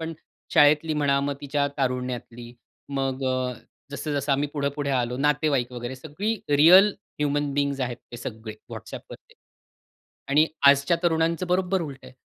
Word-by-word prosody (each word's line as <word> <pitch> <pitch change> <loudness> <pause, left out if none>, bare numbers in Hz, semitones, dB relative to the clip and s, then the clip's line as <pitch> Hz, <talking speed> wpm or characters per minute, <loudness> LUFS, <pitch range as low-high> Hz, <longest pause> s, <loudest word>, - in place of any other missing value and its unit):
पण 165 0 -4 0.4
शाळेतली 150 +2 +5
म्हणा 140 -2 +2
मग 140 0 -2
तिच्या 145 0 0
तारुण्यातली. 125 -2 -3 0.4
मग 135 -1 -2
अ, 130 -1 -1 0.4
जसं-जसं 145 -1 -2
आम्ही 140 +2 0
पुढं-पुढे 140 -1 -2
आलो 125 -2 0
नातेवाईक 145 -3 +1
वगैरे 120 +1 -6
सगळी 160 - -3 0.2
रिअल 180 +8 +7 0.3
ह्युमन 145 -1 0
बीइंग्स 140 -1 0
आहेत 125 -2 -2 0.2
ते - - -6
सगळे 110 -2 -7 0.2
WhatsAppवरती 475 -1 -10 0.9
आणि 150 +3 +4 0.2
आजच्या 140 +4 +5
तरुणांचं 165 +1 +1
बरोबर 185 +1 +1
उलट 140 -4 -7
आहे. - - -12
140 Hz, 135 wpm, -25 LUFS, 130-155 Hz, 0.9 s, रिअल